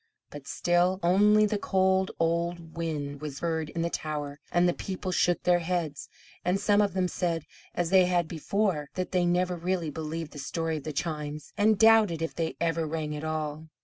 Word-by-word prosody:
But 145 -2 -10
still 175 +2 +2
only 210 +4 +5
the 210 0 -1
cold 190 -1 +2
old 170 0 -1
wind 150 -4 -3
was 145 -3 -6
heard 160 -2 -1
in 165 +1 -3
the 170 - 0
tower 145 -2 -4
and 175 0 +3
the 175 - +2
people 185 0 -4
shook 175 -1 +1
their 175 0 +4
heads; 165 -4 -3 0.3
and 180 +2 +1
some 205 0 +3
of 200 -3 +1
them 185 -1 +2
said, 170 -3 -2 0.3
as 175 -1 -1
they 190 -1 +6
had 175 -2 +1
before, 170 -2 -1
that 185 -1 -3
they 180 -1 +2
never 180 +1 +1
really 175 -2 -2
believed 160 +1 -5
the 145 - -9
story 160 +3 -2
of 150 - -9
the 155 - -3
chimes, 150 -1 -4
and 215 0 +3
doubted 220 -7 +5
if 165 - -3
they 165 -1 -2
ever 165 -1 0
rang 155 -1 -3
at 150 - -6
all. 155 0 -3
170 Hz, 195 wpm, -28 LUFS, 155-185 Hz, 0.3 s, they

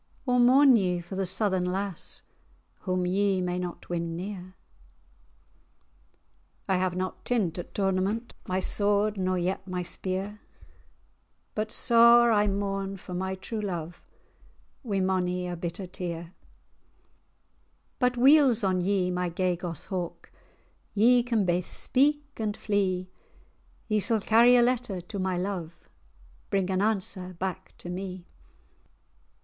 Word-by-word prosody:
Or 250 -2 +2
mourn 260 +1 +6
ye 180 -4 0
for 175 +3 -8
the 190 -1 -1
Southern 190 -1 +1
lass, 190 0 -3 0.6
Whom 185 -1 0
ye 195 +1 +1
may 180 0 -2
not 180 -1 -6
win 170 -1 -3
near?" 190 +3 -5 0.8
[#] - - -38
lost - - -21
"I 190 - +3
have 185 -1 0
not 185 0 -4
tint 195 -9 0
at 175 - -9
tournament 195 +4 -1
My 185 0 0
sword, 205 +2 +2
nor 185 -1 0
yet 185 +2 -2
my 180 -1 -3
spear; 190 +4 -4 1.1
But 215 0 -2
sair[#] 235 +1 +6
I 210 0 +3
mourn 195 0 -2
for 185 -1 -9
my 190 +1 -2
true 215 +3 -5
love, 175 -4 -5 0.8
Wi' 205 -7 -2
mony 180 -1 0
a 175 - -4
bitter 170 +3 -5
tear. 175 -2 -5
[#] - - -8
sore 170 +1 -15 1.7
But 250 -1 +1
weel's 265 -3 +5
me 195 - +3
on 185 -1 0
ye, 185 -1 +1
my 180 0 -1
gay 180 +1 0
goss 170 -1 -6
hawk, 180 -4 -5 0.6
Ye 240 +4 +5
can 230 -4 0
baith 175 0 0
speak 290 +2 +2
and 215 -1 -2
flee; 185 -3 -1 0.8
Ye 215 -2 +1
sall 220 +3 +1
carry 235 +4 +6
a 240 - +6
letter 245 -6 0
to 185 +3 -7
my 185 -1 -1
love, 180 -3 -4 0.7
Bring 195 -2 0
an 185 0 +1
answer 190 -3 -1
back 185 +1 -5
to - - -4
me." 185 0 -6
190 Hz, 145 wpm, -27 LUFS, 180-215 Hz, 1.7 s, mourn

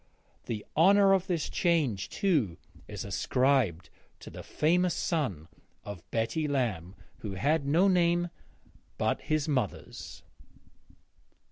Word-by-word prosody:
The 110 -3 -4
honour 195 +4 +6
of 190 -1 +1
this 170 -4 -1
change 150 - 0
too 150 - 0 0.3
is - - -6
ascribed 125 - +1 0.3
to - - -10
the - - -8
famous 175 +3 +1
son 115 - -2 0.4
of 100 -2 -9
Betty 115 +9 -1
Lamb, 105 - -2 0.2
who 105 -3 -6
had 145 +6 +1
no 170 +7 +4
name 175 -1 +2 0.7
but - - 0
his 155 -1 -1
mother's. 130 -9 -4
145 Hz, 115 wpm, -29 LUFS, 105-175 Hz, 0.7 s, honour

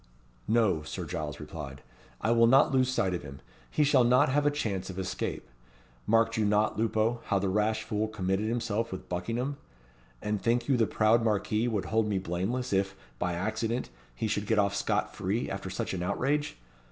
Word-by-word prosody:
"No," 110 -9 +3
Sir 75 - -5
Giles 75 -1 -4
replied, 65 0 -8 0.4
"I 115 - +1
will 115 0 +5
not 135 +5 +5
lose 130 -1 +3
sight 115 -8 +1
of 90 - -2
him. 70 -1 -10 0.3
He 150 - +2
shall 140 -3 +5
not 125 +5 +4
have 145 +2 +2
a - - +6
chance 100 -11 -2
of 95 - -7
escape. 95 -1 -3 0.6
Marked 115 +1 +3
you 110 - +2
not, 105 +1 +2
Lupo, 115 +1 +1
how 100 - +1
the 95 0 0
rash 110 +2 +1
fool 105 +1 -1
committed 100 0 -1
himself 115 -1 -1
with 95 - -7
Buckingham? 115 +10 -2 0.6
And 105 +4 -2
think 120 +1 +1
you 135 - +3
the 115 -2 +3
proud 110 +2 +3
Marquis 110 +1 +1
would 110 -5 -1
hold 110 -1 +1
me 100 -2 0
blameless, 95 +8 -2
if, 95 0 +1 0.2
by 90 0 0
accident, 110 +6 -2 0.2
he - - -2
should 105 -1 -1
get 110 - +2
off 100 -1 +3
scot - - 0
free, 105 +6 -1
after 95 -1 -4
such 95 - -3
an 90 - -3
outrage? 145 +10 -1
110 Hz, 190 wpm, -29 LUFS, 95-120 Hz, 0.6 s, a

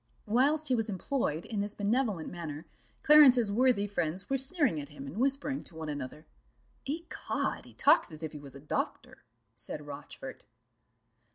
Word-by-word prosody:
Whilst 280 +8 +2
he - - +3
was 225 -2 0
employed 190 - -2
in 215 - -3
this 205 +1 -2
benevolent 210 -4 0
manner, 160 -2 -6 0.4
Clarence's 260 -8 +7
worthy 235 -2 +3
friends 185 0 -3
were 270 - +3
sneering 265 - +2
at 145 - -10
him, 145 -2 -9
and 140 +8 -8
whispering 275 +1 0
to 165 - -14
one 160 -1 -5
another; 145 +1 -6 0.6
"Ecod, 330 +3 -3
he - - -16
talks 290 - +4
as 155 +1 -5
if 155 - -3
he 150 - -8
was 140 -2 -12
a - - -9
doctor," 150 - -4 0.3
said 150 +5 -6
Rochfort. 145 0 -9
205 Hz, 165 wpm, -31 LUFS, -, 0.6 s, Clarence's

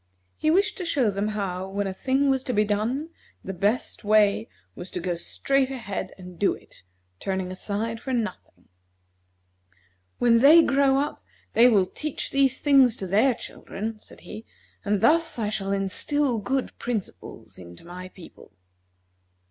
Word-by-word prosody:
He 310 - 0
wished 400 +6 +2
to - - -3
show 270 -10 +1
them 200 +1 -2
how, 190 -3 -3
when 200 +1 -2
a 190 - -3
thing 270 +6 +1
was 265 -1 0
to 250 - -1
be 210 -1 +3
done, 225 +9 -1 0.3
the 195 - -5
best 205 +7 -1
way 205 - +3 0.2
was 180 - -8
to - - -4
go 180 0 -2
straight 265 +10 0
ahead 235 -7 -5
and 180 -2 -12
do 205 - +2
it, - - -18 0.4
turning 190 -1 -3
aside 220 +4 -3
for 265 - -5
nothing. 225 -7 -4 1.5
"When 235 -1 +4
they 310 +6 +8
grow 275 -1 +3
up 290 +2 -2 0.3
they 240 +2 +7
will 200 -5 +4
teach 300 +10 -5
these 270 -1 +2
things 270 -5 +5
to 195 - -6
their 215 +7 +3
children," 215 +1 -7
said - - -17
he; 220 - -9 0.4
"and 205 -1 0
thus 330 -1 +3
I 215 -3 -1
shall 195 -2 -3
instil 230 +7 0
good 265 +5 -2
principles 230 -5 -6
into 85 - -13
my 180 +1 -8
people." 185 -2 -15
215 Hz, 160 wpm, -25 LUFS, 195-270 Hz, 1.5 s, they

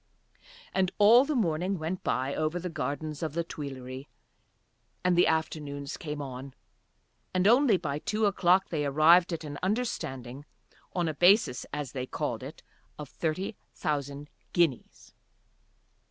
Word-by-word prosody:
And 190 -1 +1
all 230 +5 +7
the 300 0 -1
morning 185 -3 0
went 165 +3 -4
by 130 +2 0
over 155 +2 -1
the 180 +1 -4
gardens 150 +1 -4
of 160 -3 -3
the 170 - 0
Tuileries 135 -4 -7 1.0
and 180 0 +3
the 175 - +5
afternoons 150 -3 -2
came 150 -2 -5
on, 130 0 -8 0.8
and 185 +1 +3
only 240 -2 +5
by 150 -4 -3
two 215 +6 0
o'clock 190 -2 +3
they 155 -3 -1
arrived 160 +5 +5
at 165 -1 -3
an 145 -1 -6
understanding, 140 - -3 0.5
on 175 -2 0
a 160 - -1
basis, 175 - +4
as 145 -3 -4
they 130 -1 -4
called - - -3
it, - - -9 0.3
of 150 -2 -8
thirty 175 +8 -3 0.2
thousand 145 -1 -3 0.2
guineas. 165 -8 -1
155 Hz, 140 wpm, -29 LUFS, 140-185 Hz, 1.0 s, all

